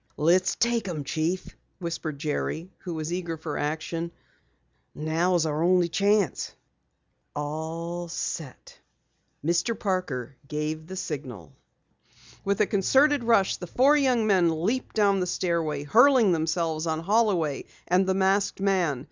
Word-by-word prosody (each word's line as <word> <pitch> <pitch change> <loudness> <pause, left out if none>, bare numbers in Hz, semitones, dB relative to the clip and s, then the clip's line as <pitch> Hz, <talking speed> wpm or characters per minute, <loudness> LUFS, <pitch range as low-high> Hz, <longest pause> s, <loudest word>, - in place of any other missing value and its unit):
"Let's 180 +4 +3
take 235 -3 0
'em, 160 -5 -3
Chief!" 160 +7 -2 0.3
whispered 165 -4 -4
Jerry, 155 +4 -3
who 175 -3 -6
was 160 +2 -3
eager 170 -2 -3
for 155 -2 -5
action. 160 +3 -3 0.8
"Now 165 +4 +1
is 165 -2 +2
our 155 0 -1
only 175 0 +3
chance." 200 0 +1 0.8
"All 160 +4 -4
set!" 160 -4 -6 0.7
Mr. 175 +8 +1
Parker 140 - -2
gave 155 +1 -3
the 190 - -7
signal. 135 - -6 0.9
With 200 +1 0
a - - +5
concerted 265 +8 +3
rush, 225 -5 +3
the 180 - -7
four 270 - +4
young 255 -6 +2
men 170 -6 +2
leaped 255 +7 -1
down 200 -2 +3
the 180 - -1
stairway, 165 -5 -1
hurling 240 - +5
themselves 160 0 0
on 160 0 -1
Holloway 185 -7 +1 0.2
and 185 +2 +3
the 190 - +1
masked 195 +1 +1
man. 185 -8 +1
175 Hz, 135 wpm, -26 LUFS, 155-195 Hz, 0.9 s, a